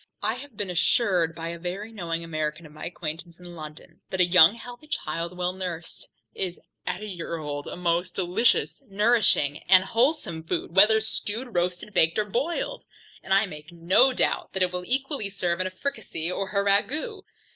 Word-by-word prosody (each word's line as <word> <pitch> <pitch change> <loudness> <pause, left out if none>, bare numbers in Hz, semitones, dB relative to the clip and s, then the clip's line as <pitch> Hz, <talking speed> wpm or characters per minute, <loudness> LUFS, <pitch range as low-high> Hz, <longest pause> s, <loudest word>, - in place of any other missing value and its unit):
I 215 +2 +2
have 255 -2 -10
been 200 -3 -3
assured 175 -1 +2
by 165 0 -5
a 170 0 -6
very 190 +5 -5
knowing 170 -6 -3
American 155 0 -3
of 150 - -13
my 155 +1 -8
acquaintance 170 0 -6
in 175 -1 -11
London, 155 -1 -11
that 190 - -3
a 180 - +6
young 175 +2 +7
healthy 245 +5 -11
child 170 - -3
well 180 0 0
nursed, 180 -3 -6 0.2
is, 180 -2 -4 0.3
at 180 +3 -2
a - - -4
year 175 -4 -5
old, 145 -2 -5
a - - -5
most 175 0 0
delicious 190 +10 +1
nourishing 205 -8 +3
and 185 -1 +8
wholesome 225 - +1
food, 165 +1 -3
whether 215 +3 +7
stewed, 220 +2 -3
roasted, 180 +3 -1
baked, 165 -3 +3
or 215 - +2
boiled; 260 - -2 0.4
and - - -11
I 195 +2 +5
make 155 -2 -10
no 175 +10 +4
doubt - - 0
that 190 - +1
it 180 - +1
will 180 0 -4
equally 270 -4 -1
serve 180 -3 -1
in 185 - 0
a - - -3
fricasee, 185 - -4
or 195 +1 -3
a 200 -1 +1
ragoust. 300 - +1
180 Hz, 190 wpm, -26 LUFS, 170-215 Hz, 0.4 s, and